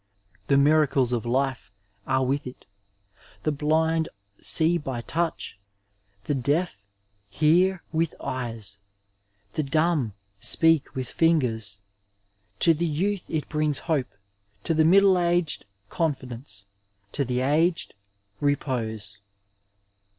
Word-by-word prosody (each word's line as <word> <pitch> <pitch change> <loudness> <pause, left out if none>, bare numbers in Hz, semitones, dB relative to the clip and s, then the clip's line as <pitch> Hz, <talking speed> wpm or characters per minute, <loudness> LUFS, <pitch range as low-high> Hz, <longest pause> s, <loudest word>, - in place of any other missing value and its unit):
The 140 - +4
miracles 140 -3 +3
of 120 -1 -2
life 130 -1 -1 0.4
are 130 0 +2
with 140 +1 -1
it; 125 - -11 0.8
the 155 - +1
blind 160 +2 +1 0.3
see 165 +2 +3
by 135 -5 -4
touch, 165 - -3 0.6
the 145 - -1
deaf 140 - -1 0.5
hear 170 - +3
with 165 -1 0
eyes, 115 -6 -5 0.8
the - - 0
dumb 150 - +1 0.3
speak 165 +6 +3
with 130 -2 -3
fingers. 115 -11 +1 0.8
To 165 - +6
the 170 +2 -1
youth 185 +5 -1
it 155 -2 -2
briugs 150 -2 0
hope, 150 -6 -1 0.5
to - - 0
the 160 0 +3
middle 190 +2 +6
aged 175 - 0 0.2
confidence, 125 - -4 0.5
to 140 - -1
the 125 -1 -1
aged 160 +6 +1 0.5
repose. 110 -8 -2
145 Hz, 110 wpm, -25 LUFS, 125-165 Hz, 0.8 s, To